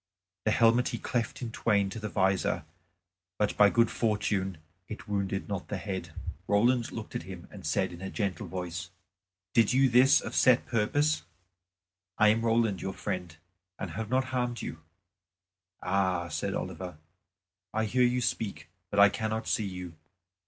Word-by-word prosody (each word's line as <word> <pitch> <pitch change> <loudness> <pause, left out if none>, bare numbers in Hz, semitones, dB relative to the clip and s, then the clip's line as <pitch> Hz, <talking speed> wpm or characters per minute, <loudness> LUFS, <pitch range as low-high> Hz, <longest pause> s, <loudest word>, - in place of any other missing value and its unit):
The 110 - +3
helmet 115 +3 +4
he - - -2
cleft 120 +1 -2
in 115 - -4
twain 105 -4 +2
to 115 - -5
the 105 0 -4
visor; 95 -2 +1 0.7
but 105 - +1
by 105 -1 +7
good 115 +2 +3
fortune 105 -4 0 0.3
it 110 +1 -8
wounded 100 -1 -2
not 100 -3 -4
the 105 - -3
head. 95 -2 -5 0.4
Roland 120 +4 +3
looked - - -7
at - - -2
him - - -8
and - - -10
said - - 0
in 85 - -10
a 95 - -4
gentle 100 0 -2
voice, 90 0 -5 0.6
"Did 115 0 +4
you 135 +1 +5
this 130 +3 +6
of - - -6
set 130 -2 +4
purpose? 145 +7 +1 1.0
I 110 - +6
am 110 +2 +3
Roland 115 -4 +2
your 95 - -3
friend, 90 -5 -4 0.4
and 95 - -5
have 110 +5 -4
not 130 +1 +2
harmed 125 -2 -1
you." 80 - -5 1.0
"Ah!" 95 -3 +1
said - - -2
Oliver, 90 -4 -5 0.7
"I 110 +1 0
hear 125 +4 +1
you 125 0 +3
speak, 105 -7 -2 0.2
but 100 - 0
I 100 0 +9
cannot 110 +2 -3
see 105 - 0
you. 90 -2 -7
105 Hz, 165 wpm, -29 LUFS, 95-115 Hz, 1.0 s, I